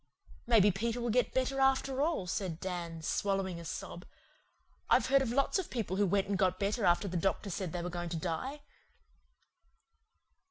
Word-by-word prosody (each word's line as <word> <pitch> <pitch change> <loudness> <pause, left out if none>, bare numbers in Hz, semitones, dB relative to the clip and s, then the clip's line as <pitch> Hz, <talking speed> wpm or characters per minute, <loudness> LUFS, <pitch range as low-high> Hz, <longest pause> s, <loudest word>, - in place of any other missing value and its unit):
"Maybe 210 -4 +6
Peter 230 +5 -2
will 240 -1 -1
get 250 +2 +2
better 260 +1 0
after 270 0 +2
all," 305 - 0
said 180 -2 -3
Dan, 170 -3 -5
swallowing 195 -1 -1
a - - -8
sob. 175 +2 -6 0.9
"I've - - +5
heard 275 +1 +4
of 265 - -1
lots 275 +8 +2
of 375 - -4
people 215 -6 -2
who 205 0 +3
went 195 +2 +2
and 195 -1 -1
got 185 -1 +2
better 205 +3 0
after 175 +3 +3
the 180 -1 -2
doctor 195 +3 -1
said 180 -1 -3
they 175 0 -3
were 180 - -3
going 175 0 -4
to 165 - -3
die." 185 - -3
195 Hz, 185 wpm, -32 LUFS, 175-245 Hz, 0.9 s, Maybe